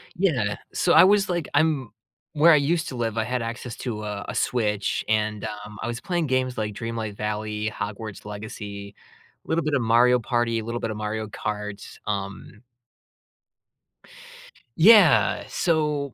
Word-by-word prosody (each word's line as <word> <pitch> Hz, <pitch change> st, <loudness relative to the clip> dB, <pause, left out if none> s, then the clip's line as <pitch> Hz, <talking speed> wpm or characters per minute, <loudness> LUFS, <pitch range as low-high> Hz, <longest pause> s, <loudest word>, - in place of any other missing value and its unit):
Yeah. 130 Hz, -, +1 dB, 0.2 s
So, -, -, +2 dB
I -, -, +9 dB
was, 200 Hz, +1 st, +4 dB
like, 175 Hz, -5 st, -1 dB
I'm 145 Hz, -5 st, +1 dB, 0.4 s
where 160 Hz, +2 st, +6 dB
I -, -, +7 dB
used 160 Hz, +3 st, +1 dB
to 130 Hz, -, -7 dB
live, 115 Hz, -2 st, -2 dB
I 110 Hz, -, +1 dB
had 125 Hz, +1 st, -2 dB
access 115 Hz, +1 st, -5 dB
to 110 Hz, -4 st, -4 dB
a 105 Hz, -1 st, -4 dB
a -, -, -5 dB
Switch, 105 Hz, -4 st, 0 dB
and, 105 Hz, -1 st, 0 dB
um, 105 Hz, -1 st, -7 dB
I 110 Hz, -, -2 dB
was 120 Hz, 0 st, -4 dB
playing 175 Hz, -1 st, -1 dB
games 130 Hz, -1 st, 0 dB
like 105 Hz, -1 st, -2 dB
Dreamlight 115 Hz, -1 st, -4 dB
Valley, 105 Hz, 0 st, -2 dB
Hogwarts 105 Hz, +1 st, -6 dB
Legacy, 105 Hz, -1 st, -8 dB, 0.5 s
little 165 Hz, +1 st, -1 dB
bit 155 Hz, -, -1 dB
of 135 Hz, -, +2 dB
Mario 120 Hz, +2 st, +4 dB
Party, 120 Hz, -1 st, 0 dB
little 115 Hz, +2 st, -4 dB
bit 115 Hz, -, -3 dB
of 105 Hz, -, -5 dB
Mario 110 Hz, +1 st, -3 dB
Karts, 105 Hz, 0 st, -6 dB
um 100 Hz, 0 st, -5 dB, 2.2 s
Yeah. 200 Hz, +1 st, +6 dB
So 150 Hz, -5 st, 0 dB
115 Hz, 155 wpm, -24 LUFS, 105-140 Hz, 2.2 s, I